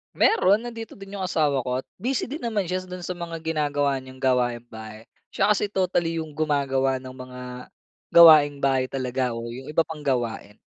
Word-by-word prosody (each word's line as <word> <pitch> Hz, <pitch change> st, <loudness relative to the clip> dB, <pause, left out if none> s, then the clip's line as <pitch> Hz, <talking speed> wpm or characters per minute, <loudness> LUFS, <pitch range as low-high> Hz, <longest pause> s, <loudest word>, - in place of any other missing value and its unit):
Meron, 215 Hz, -, +4 dB
nandito 230 Hz, -2 st, -7 dB
din 195 Hz, 0 st, -9 dB
yung 190 Hz, -, -2 dB
asawa 150 Hz, -6 st, +1 dB
ko 125 Hz, +1 st, -2 dB
at -, -, -50 dB
busy 255 Hz, 0 st, -1 dB
din 295 Hz, +4 st, -5 dB
naman 220 Hz, -4 st, -1 dB
siya 185 Hz, +1 st, -3 dB
dun 180 Hz, -1 st, -8 dB
sa 185 Hz, -, -4 dB
mga 170 Hz, -2 st, -6 dB
ginagawa 145 Hz, -3 st, 0 dB
niyang 130 Hz, 0 st, -13 dB
gawaing 125 Hz, -2 st, +1 dB
bahay. 110 Hz, -1 st, -10 dB, 0.3 s
Siya 195 Hz, +2 st, +2 dB
kasi 210 Hz, 0 st, +1 dB
totally 175 Hz, -4 st, 0 dB
yung 155 Hz, -, -11 dB
gumagawa 140 Hz, -3 st, 0 dB
ng 130 Hz, 0 st, -9 dB
mga 125 Hz, 0 st, -10 dB, 0.7 s
gawaing 155 Hz, -4 st, +8 dB
bahay 130 Hz, -1 st, +2 dB
talaga 130 Hz, -2 st, -2 dB
o 115 Hz, 0 st, -5 dB
yung 130 Hz, +3 st, -9 dB
iba 155 Hz, +2 st, +2 dB
pang 160 Hz, -1 st, -8 dB
gawain. 115 Hz, -5 st, -2 dB
145 Hz, 185 wpm, -24 LUFS, 130-180 Hz, 0.7 s, gawaing